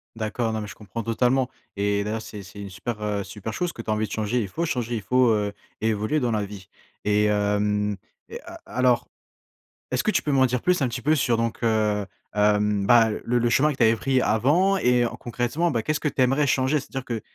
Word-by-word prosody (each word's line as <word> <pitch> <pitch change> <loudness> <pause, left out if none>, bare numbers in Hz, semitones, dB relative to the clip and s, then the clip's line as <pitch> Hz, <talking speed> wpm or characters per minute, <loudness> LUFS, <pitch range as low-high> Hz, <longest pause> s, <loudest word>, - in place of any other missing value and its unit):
D'accord, 110 +1 -2
non 110 - -2
mais 105 - -5
je - - -9
comprends 105 +2 -6
totalement. 125 +3 +1 0.3
Et 100 0 0
d'ailleurs, 110 +2 -3
c'est 105 -2 -9
c'est 95 +2 -12
une 100 - -7
super, 105 +4 -5
heu, 105 -1 -1
super 100 +3 -7
chose 175 +8 -2
que 115 - -7
tu - - -9
as 110 - +3
envie 110 0 0
de - - -11
changer. 110 +3 0
Il 105 - -3
faut 160 - -3
changer, 120 -5 -2
il 110 - -3
faut, 125 +4 +3
heu, 105 -1 0 0.3
évoluer 110 +7 +1
dans 125 -4 0
la 105 -2 0
vie. 100 -1 -10 0.4
Et 105 0 +2
hem 105 0 +1 0.3
et - - -7
a - - -11
alors, 125 +1 +2 0.8
est-ce 130 0 0
que 215 - +2
tu - - +1
peux 150 - -2
m'en 135 -2 +4
dire 125 -1 -2
plus, 180 -1 +2
un 135 - +2
petit 120 +1 -5
peu, 155 +5 +3
sur, 125 -4 +2
donc, 115 0 -2
heu, 105 -3 +1 0.3
hem, 105 -1 +2
bah, 115 -1 +6
le 120 +1 +1
le 120 - +2
chemin 150 +5 +3
que - - -8
tu - - +2
avais 110 +1 +5
pris 130 +3 +1
avant 150 - +3
et 125 -6 +3
en - - -5
concrètement, 120 +8 -1
bah, 115 - 0
qu'est-ce 155 +6 0
que 150 - 0
tu 135 -2 0
aimerais 135 +3 +3
changer? 130 +2 +2
C'est-à-dire 135 -1 -6
que 115 -3 -3
115 Hz, 240 wpm, -24 LUFS, 105-130 Hz, 0.8 s, bah